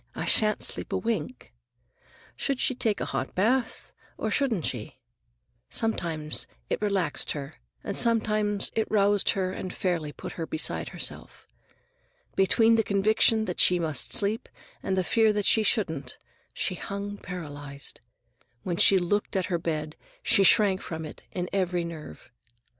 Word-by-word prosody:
I - - -3
shan't 215 -1 +4
sleep - - -2
a - - +2
wink." 150 - -3 0.8
Should 275 -2 -1
she - - +2
take 225 -4 0
a - - -2
hot - - -3
bath, 230 +5 0 0.2
or 220 - -2
shouldn't 230 - +1
she? 115 -1 -4 0.7
Sometimes 165 -9 -2 0.2
it - - 0
relaxed 195 -7 0
her, 145 0 -7 0.3
and 200 - -4
sometimes 215 -3 +2
it 220 - 0
roused 205 -1 +3
her 185 -1 0
and 185 0 -5
fairly 170 -5 -2
put - - -8
her 160 - -3
beside 155 - -2
herself. - - -4 0.9
Between 225 +4 +4
the 225 - +3
conviction 215 +2 +3
that 180 -3 -4
she 180 - +5
must 155 -6 -1
sleep 210 +2 +1 0.3
and 190 - -1
the 185 - +2
fear 220 +3 +3
that 205 -1 -1
she 220 - +5
couldn't, 160 - 0 0.3
she - - -1
hung 200 +3 -5
paralyzed. 145 -5 -7 0.6
When 175 -2 -2
she 195 - +6
looked 200 +4 0
at 190 -2 +1
her 170 - +1
bed, 155 -2 -3 0.3
she - - +4
shrank 195 0 +5
from 160 -1 -5
it 155 - -10
in 180 -1 -3
every 180 -3 0
nerve. 160 -6 -9
190 Hz, 155 wpm, -27 LUFS, 165-215 Hz, 0.9 s, she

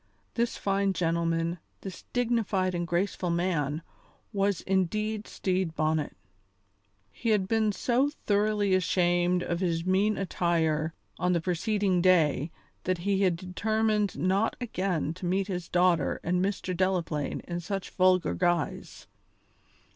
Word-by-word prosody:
This 235 0 -1
fine 195 0 +1
gentleman, 165 0 0 0.2
this 190 -2 -8
dignified 225 -6 +1
and 175 -1 -2
graceful 180 +1 -1
man, 165 -3 0 0.5
was 200 -1 +1
indeed 210 +3 -1
Stede 185 -3 -1
Bonnet. 155 -1 0 1.0
He 230 - -3
had 205 -3 +2
been 220 0 +2
so 250 +7 +1 0.2
thoroughly 205 -1 +2
ashamed 175 0 +2
of 170 -1 -2
his 170 -2 -1
mean 195 +3 +2
attire 165 -4 0 0.2
on 180 +1 +2
the 170 - +2
preceding 185 +2 0
day 165 -5 +3 0.4
that 185 0 +1
he 200 -1 +2
had 185 -3 +3
determined 210 +4 0
not 195 +4 +1
again 185 - -1
to 180 +1 -5
meet 190 +2 +1
his 180 -3 -5
daughter 175 -4 +2
and 180 +1 +1
Mr. 190 -2 -2
Delaplaine 170 -5 -1
in 175 0 -5
such 195 +3 -4
vulgar 185 -3 +3
guise. 175 -3 -1
185 Hz, 130 wpm, -28 LUFS, 170-200 Hz, 1.0 s, day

